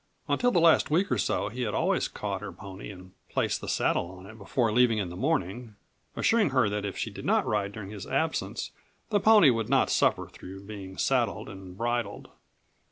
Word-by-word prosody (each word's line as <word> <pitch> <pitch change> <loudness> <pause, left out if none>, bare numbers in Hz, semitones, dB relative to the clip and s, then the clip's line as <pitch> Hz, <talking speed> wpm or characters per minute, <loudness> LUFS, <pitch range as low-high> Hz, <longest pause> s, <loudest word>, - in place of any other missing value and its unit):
Until 245 - +2
the 180 - +3
last 165 -1 +5
week 170 +4 +1
or 120 - +1
so 90 - 0
he 125 +4 -6
had 110 -4 -1
always - - +1
caught - - -4
her - - -6
pony 95 +1 -9
and 95 -2 -11 0.2
placed - - -1
the - - -5
saddle 85 - +1
on 95 0 -12
it 110 +3 -11
before 110 +2 0
leaving 120 0 +4
in 100 -4 -2
the 90 - -8
morning, 120 - -2 0.4
assuring 225 -6 +3
her 130 -5 +3
that 105 0 -2
if 100 - -5
she - - -3
did - - -9
not - - +2
ride 100 -2 -1
during 100 -1 -8
his 105 -3 -8
absence - - -1 0.4
the 205 - +3
pony 210 -9 +7
would 115 -2 -2
not - - +3
suffer - - +2
through 95 +1 -11
being 100 -2 -9
saddled 120 -5 0
and 95 -2 -10
bridled. 120 -2 -2
105 Hz, 205 wpm, -28 LUFS, 95-125 Hz, 0.4 s, pony